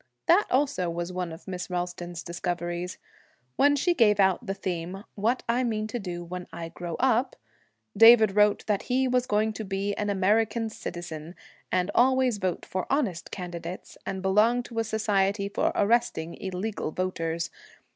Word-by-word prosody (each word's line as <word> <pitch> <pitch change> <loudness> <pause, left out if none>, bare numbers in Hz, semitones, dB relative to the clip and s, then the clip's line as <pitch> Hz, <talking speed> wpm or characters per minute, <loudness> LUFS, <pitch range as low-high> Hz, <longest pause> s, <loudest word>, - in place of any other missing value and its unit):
That 365 +5 +5
also 260 -9 +1
was 175 +1 -4
one 180 -2 -3
of 160 +5 -11
Miss 180 -1 -5
Ralston's 175 -1 -4
discoveries. 175 0 -3 0.6
When 285 +1 +4
she 350 +5 +2
gave 210 -9 +4
out 190 +4 +3
the 195 - -2
theme, 185 0 -4
'What 225 +5 0
I 240 +2 +2
Mean 215 -3 -1
to 220 +3 -4
Do 175 -4 -5
When 180 +1 -7
I 165 -1 -6
Grow 170 -1 -6
Up,' 255 0 +2 0.6
David 225 -2 +8
wrote 210 0 +4
that 205 -2 0
he 260 +1 +2
was 250 0 +1
going 215 -1 +1
to 220 - -5
be 200 0 -2
an 205 -1 -1
American 215 +3 +1
citizen, 175 -4 -7 0.4
and 185 +2 +1
always 255 -2 +3
vote 185 -3 -2
for 185 -1 -3
honest 240 - 0
candidates, 175 -1 -7
and 190 -1 -4
belong 215 +6 +3
to 230 -1 -5
a - - +2
society 205 -2 +1
for 200 - 0
arresting 205 -7 +1
illegal 190 0 -3
voters. 165 -1 -2
195 Hz, 165 wpm, -27 LUFS, 180-225 Hz, 0.6 s, David